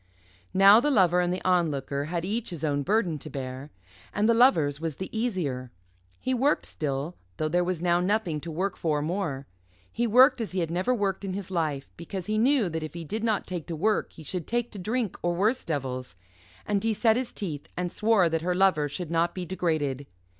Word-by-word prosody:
Now 195 +3 +8
the 295 - +1
Lover 180 - +4
and 175 0 0
the 180 - -3
Onlooker 145 -6 +1
had 170 +2 -3
each 220 +4 -2
his 170 -4 -7
own 145 -2 +1
burden 185 -2 +1
to 155 - -9
bear. 130 0 -6 0.5
And 210 +1 +2
the 230 - +5
Lover's 165 - +4
was 165 -3 -3
the 190 +7 -7
easier. 170 - -2 0.5
He 260 - -1
worked 270 +4 +2
still, 145 +2 -3 0.2
though 155 - 0
there 175 +3 +2
was 175 -1 -2
now 175 0 +3
nothing 180 -4 0
to 170 - -7
work 180 +4 -2
for 150 -3 0
more; 155 -5 -2 0.5
he 240 - 0
worked 250 +3 +6
as 215 - -4
he 190 - 0
had 165 -2 -1
never 185 +8 0
worked 200 -5 0
in 190 -2 -3
his 195 -2 -6
life, 155 -6 -1
because 175 +2 -6
he 215 +2 0
knew 255 -2 +3
that 160 -1 -3
if 155 +1 -6
he 170 - -5
did 215 +7 -4
not 220 -3 +1
take 175 -4 -5
to 170 - -4
work 210 +7 0
he 160 - -12
should 175 +1 -4
take 240 0 -1
to 205 - -8
drink 220 +2 -2
or 175 0 0
worse 215 +8 +1
devils, 130 - -4 0.5
and 200 -1 0
he 225 -1 +1
set 220 +1 +3
his 250 0 -2
teeth 160 -9 -6
and 180 -1 -2
swore 215 -5 +3
that 165 -1 -1
her 180 +2 0
Lover 180 -6 +3
should 165 +3 -5
not 170 +1 +1
be 180 -1 -4
degraded. 155 -7 -1
180 Hz, 220 wpm, -27 LUFS, 155-210 Hz, 0.5 s, Now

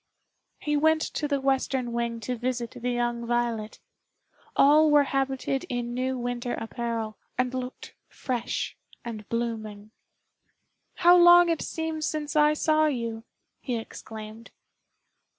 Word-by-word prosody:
He 295 0 -1
went 315 +2 +3
to 295 - -1
the 285 -1 0
western 265 -2 0
wing 235 -1 -2
to 250 +3 -3
visit 240 0 -3
the 245 -1 -4
young 240 -1 -1
Violet. 235 -2 -1 0.8
All 305 +3 +6
were 295 -1 +6
habited 270 -1 -1
in 240 -1 -3
new 255 +1 -1
winter 245 0 -3
apparel, 225 -2 -4 0.2
and 255 0 0
looked 255 0 -6 0.2
fresh 245 -2 -3 0.3
and 220 -3 -7
blooming. 220 -3 -4 1.0
"How 350 0 +6
long 350 0 +8
it 330 - 0
seems 320 -1 -3
since 300 -1 -3
I 300 0 +5
saw 310 0 +3
you!" 230 -5 -3 0.3
he 245 -3 -3
exclaimed. 220 0 -9
250 Hz, 130 wpm, -27 LUFS, 235-295 Hz, 1.0 s, long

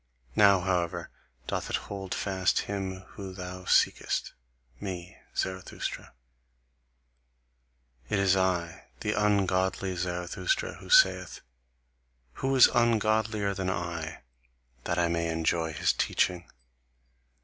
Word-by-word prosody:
Now, 100 -3 +6
however, 90 -2 -1 0.3
doth - - -3
it - - 0
hold 95 -2 -4
fast 95 -2 +1
him 95 -2 -4
whom 95 -2 -8
thou 90 0 -7
seekest, - - +2 0.5
me, 90 -2 -6 0.2
Zarathustra. 95 0 -4 2.0
It - - +1
is 95 -1 +4
I, 90 -2 0 0.2
the 105 -1 0
ungodly 95 -2 +1
Zarathustra, 90 - -2
who - - -12
saith: - - +4 0.9
'Who 135 0 -1
is 130 - +9
ungodlier 110 -3 +2
than 95 -1 -2
I, 85 -4 -4 0.6
that 85 - -1
I 85 -1 +3
may 85 0 0
enjoy 80 0 0
his 75 - +1
teaching? 90 -1 0
95 Hz, 105 wpm, -29 LUFS, 85-100 Hz, 2.0 s, is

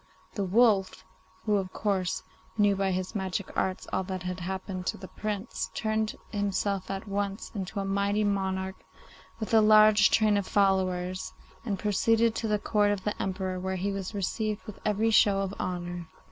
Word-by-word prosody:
The 200 - -1
wolf, 200 -1 +3 0.4
who, 210 -2 +3
of 190 -2 -3
course, 190 -4 -1 0.3
knew 205 -1 +4
by 195 0 0
his 185 +1 -2
magic 190 -2 -3
arts 185 -1 -1
all 190 - +2
that 185 -1 -4
had 180 0 -4
happened 185 +1 -4
to - - -1
the 190 - -9
Prince, 210 +1 -4
turned 220 -1 -1 0.2
himself 200 -1 -1
at 195 +2 -4
once 200 0 -3
into 200 -1 -4
a 195 - -2
mighty 200 +2 +1
monarch 190 -2 -1 0.6
with 220 0 -4
a 220 - +7
large 215 -1 +7
train 215 -2 +3
of 200 - -2
followers, 185 -2 +1 0.3
and 210 -4 -2
proceeded 225 +3 +2
to 225 - -2
the 210 -1 +2
Court 205 0 +2
of 205 -2 -1
the 210 - -2
Emperor, 185 -1 -2
where 190 +1 -2
he 195 +2 -1
was 195 +1 -4
received 210 +2 -2
with 215 -3 -9
every 215 +2 +1
show 200 -2 +5
of 195 0 -3
honour. 175 -1 -4
200 Hz, 175 wpm, -28 LUFS, 190-210 Hz, 0.6 s, a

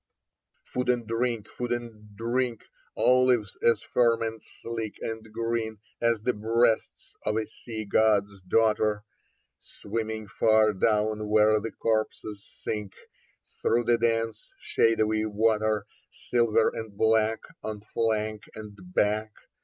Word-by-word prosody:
Food 125 0 -3
and 120 -2 +2
drink, 115 -1 -1
food 120 0 -5
and 110 -3 -5
drink: 120 0 -1 0.3
Olives 125 -5 +3
as 115 - +3
firm 115 -2 +2
and 110 -1 -4
sleek 115 -2 -6
and 110 -1 -6
green 115 -1 -2 0.2
As 115 -2 +1
the 125 - +1
breasts 115 +2 0
of 105 - 0
a 110 - 0
sea 110 0 -7
god's 100 -1 +2
daughter, 105 0 +2 0.6
Swimming 110 0 -5
far 110 +1 +3
down 105 +1 +1
where 110 0 +5
the 115 +2 -4
corpses 110 -2 -2 0.2
sink 105 -3 -3 0.7
Through 120 +1 +2
the 120 0 +2
dense 115 -2 -1
shadowy 110 -1 +2
water. 110 -1 +1 0.2
Silver 115 -2 +1
and 110 -3 -7
black 110 0 +2 0.2
on 105 -1 -5
flank 110 -1 -2
and 105 -1 -9 0.2
back. 105 +1 +1
110 Hz, 120 wpm, -27 LUFS, 105-115 Hz, 0.7 s, where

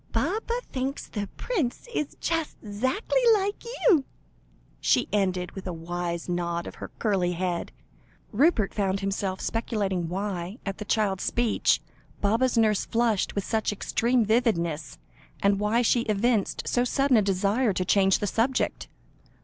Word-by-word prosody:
Baba 425 - -1
thinks 265 +1 -3
the 205 -2 -5
prince 350 - -2
is 300 - -2
just 325 -2 -1
'zackly 260 - 0
like 405 0 -2 0.2
you," 340 - +6 0.8
she - - +2
ended, 185 -3 0
with 195 -1 -8
a 180 - -3
wise 170 +1 -4
nod 170 -1 -2
of - - -7
her - - -5
curly 190 -5 +1
head. 175 0 -2 0.6
Rupert 240 - +3
found 195 -1 0
himself 195 -1 -2
speculating 200 -7 -1
why, 190 +1 -3
at 195 -1 -4
the 210 - -5
child's 200 -3 +1
speech, 235 -2 +2 0.4
Baba's 230 +5 +2
nurse 215 -3 +3
flushed 230 -4 0
with 200 - 0
such 220 -1 0
extreme 235 +3 +1
vividness, 170 - 0 0.5
and 200 0 +3
why 215 +4 +2
she 240 +1 +3
evinced 215 0 +1
so 245 - +2
sudden 270 +1 +2
a - - +5
desire 200 +4 +1
to 185 -1 -1
change 195 0 +4
the - - -2
subject. 230 +6 0
210 Hz, 145 wpm, -26 LUFS, 190-245 Hz, 0.8 s, you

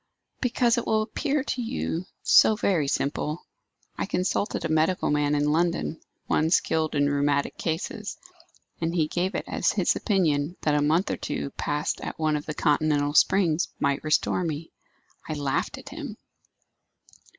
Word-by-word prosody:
"Because 240 -1 +2
it - - -6
will 215 0 +2
appear 285 +5 -1
to 255 -2 -2
you 205 -7 -3 0.2
so 220 - +6
very 180 -9 +1
simple. 150 +4 -2 0.5
I - - -1
consulted 185 0 -1
a - - +2
medical 160 +3 +1
man 150 0 +2
in 145 0 +2
London, 170 0 0 0.2
one 155 +1 +1
skilled 160 -2 +1
in 145 0 +3
rheumatic 145 0 +1
cases, 175 +5 -3 0.6
and 165 +1 -1
he 160 -3 +2
gave 180 +4 -1
it - - -2
as - - +1
his - - +2
opinion 170 -5 +1
that 150 - +1
a 145 - +2
month 160 +6 +2
or - - -2
two 140 - -4
passed 150 +1 -2
at - - -5
one 155 -1 +1
of 150 - -4
the 155 - -4
continental 145 -1 +2
springs 175 0 +3
might 140 -2 0
restore 155 +3 +1
me. 160 -1 -4 0.6
I - - -1
laughed 140 -2 -1
at - - -10
him." - - -7
155 Hz, 160 wpm, -26 LUFS, 150-180 Hz, 0.6 s, so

